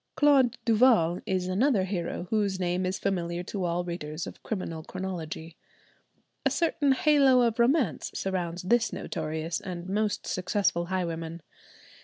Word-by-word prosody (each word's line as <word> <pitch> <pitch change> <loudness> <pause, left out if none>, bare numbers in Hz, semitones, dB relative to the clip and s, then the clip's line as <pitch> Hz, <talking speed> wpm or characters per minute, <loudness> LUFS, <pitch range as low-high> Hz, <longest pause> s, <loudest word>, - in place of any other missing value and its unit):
Claude 275 -5 +4
Duval 220 -7 +4
is 185 -1 0
another 205 +3 +2
hero 180 -2 -3
whose 205 -3 +1
name 180 0 0
is 185 - -2
familiar 175 -3 -2
to 190 0 -3
all 175 +1 0
readers 165 -2 -5
of - - -10
criminal 165 -6 -4
chronology. 165 -3 -6 0.9
A - - +3
certain 310 -4 +2
halo 275 -3 +5
of 235 -1 0
romance 245 - +2
surrounds 180 -2 -2
this 240 +5 +2
notorious 160 +2 -3
and 180 -3 -6
most 210 +1 -1
successful 185 -2 0
highwayman. 170 -3 -3
185 Hz, 135 wpm, -28 LUFS, 170-225 Hz, 0.9 s, halo